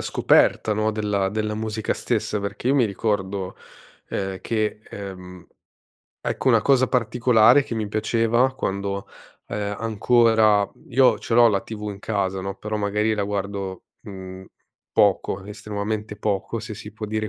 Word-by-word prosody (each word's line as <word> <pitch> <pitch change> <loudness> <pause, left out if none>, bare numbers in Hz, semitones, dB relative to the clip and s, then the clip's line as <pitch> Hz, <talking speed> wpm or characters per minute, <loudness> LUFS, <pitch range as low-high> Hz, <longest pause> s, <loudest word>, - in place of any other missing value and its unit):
scoperta, 110 - +3
no, 110 +1 +1
della 105 -2 0
della 105 +1 -2
musica 110 0 -2
stessa 105 - -1
perché 100 +5 -3
io 140 - +3
mi 125 -5 +4
ricordo, 100 -2 -2 0.5
ehm, 95 -1 -3
che, 110 -1 -1
ehm, 90 -2 -9 0.7
ecco 135 - -1
una 115 -3 +5
cosa 130 -2 +4
particolare 120 +2 +4
che 115 - -5
mi 110 -2 -2
piaceva 115 +4 +1
quando, 100 -3 -3 0.4
ehm, 105 0 -3
ancora 110 -2 +3 0.2
io 130 -1 +4
ce 115 - -3
l'ho 120 -1 +7
la 100 -2 +1
TV 105 -1 -7
in 100 - -8
casa, 95 -3 -2
no, 95 0 -4
però 105 +1 -4
magari 105 +1 0
la 100 -1 -1
guardo, 100 -2 -4 0.2
mhmm, 95 -2 -9 0.5
poco, 100 -1 +2
estremamente 105 +1 -4
poco 105 +2 -2
se 110 -1 -7
si 105 0 -10
può 110 0 -7
dire 110 0 -2
105 Hz, 150 wpm, -23 LUFS, 100-110 Hz, 0.7 s, l'ho